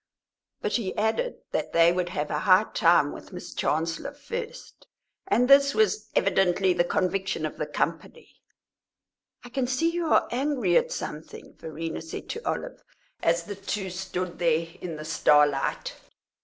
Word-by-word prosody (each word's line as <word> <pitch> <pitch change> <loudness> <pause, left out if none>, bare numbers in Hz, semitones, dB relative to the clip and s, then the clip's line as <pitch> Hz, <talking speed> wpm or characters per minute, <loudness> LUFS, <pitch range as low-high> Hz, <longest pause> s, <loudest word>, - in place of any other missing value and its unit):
But - - +1
he 200 -6 -4
added 220 - -1
that - - -2
they 170 0 +6
would 180 -1 -1
have 150 -4 -3
a 150 - 0
high 185 +4 +5
time 165 -4 +4
with - - -11
Miss 180 -1 -8
Chancellor 165 - -1
first, 465 +10 -7 0.4
and 250 -10 +3
this 280 +1 +6
was 435 0 +1
evidently 185 0 +3
the 175 - +2
conviction 195 +1 -1
of - - -5
the - - -3
company. 475 - -4 1.0
"I 245 - -10
can 250 +1 -1
see 295 +7 +1
you 340 -1 -2
are - - +3
angry 250 -8 0
at - - +3
something," 150 +1 -7
Verena 160 +1 -6
said 160 - -8
to 460 - -4
Olive, - - -4 0.4
as 170 +1 +2
the 205 - -6
two 195 -1 -4
stood 185 -1 -4
there 165 -1 +1
in 170 -3 -5
the 155 0 -8
starlight. 150 -3 +2
185 Hz, 155 wpm, -26 LUFS, 165-255 Hz, 1.0 s, they